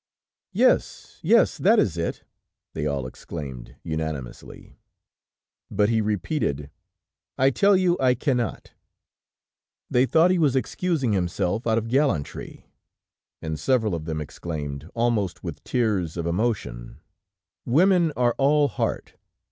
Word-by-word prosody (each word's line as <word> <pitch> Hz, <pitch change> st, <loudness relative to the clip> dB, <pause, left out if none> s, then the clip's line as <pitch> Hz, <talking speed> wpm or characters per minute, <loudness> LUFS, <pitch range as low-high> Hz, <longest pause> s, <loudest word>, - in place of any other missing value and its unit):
"Yes, -, -, +1 dB
yes, -, -, +3 dB
that -, -, +4 dB
is -, -, +2 dB
it!" -, -, -3 dB, 0.5 s
they 75 Hz, -1 st, -2 dB
all 70 Hz, -3 st, -2 dB
exclaimed 65 Hz, -2 st, -8 dB
unanimously. 80 Hz, -5 st, -6 dB, 0.9 s
But 105 Hz, +1 st, +2 dB
he 115 Hz, -1 st, +2 dB
repeated: 105 Hz, -, -2 dB, 0.7 s
"I 135 Hz, +1 st, +4 dB
tell 200 Hz, +7 st, +4 dB
you, 180 Hz, -1 st, +2 dB
I 125 Hz, -1 st, +3 dB
cannot." 125 Hz, -2 st, -2 dB, 1.2 s
They 125 Hz, +2 st, +3 dB
thought 165 Hz, +7 st, +4 dB
he 185 Hz, -, +2 dB
was 145 Hz, -5 st, +3 dB
excusing 135 Hz, -3 st, 0 dB
himself 90 Hz, +4 st, -1 dB
out 110 Hz, 0 st, +2 dB
of 115 Hz, 0 st, -1 dB
gallantry, 115 Hz, -, -1 dB, 0.8 s
and 80 Hz, -1 st, -3 dB
several 110 Hz, -, +1 dB
of 80 Hz, -2 st, -4 dB
them 80 Hz, -1 st, -3 dB
exclaimed, 75 Hz, -1 st, -6 dB
almost 115 Hz, -5 st, 0 dB
with -, -, -7 dB
tears 100 Hz, -9 st, 0 dB
of 85 Hz, -, -2 dB
emotion: 85 Hz, -, -2 dB, 0.7 s
"Women 175 Hz, +4 st, +4 dB
are 120 Hz, -2 st, +2 dB
all 145 Hz, +1 st, +4 dB
heart!" -, -, -3 dB
110 Hz, 125 wpm, -24 LUFS, 80-135 Hz, 1.2 s, that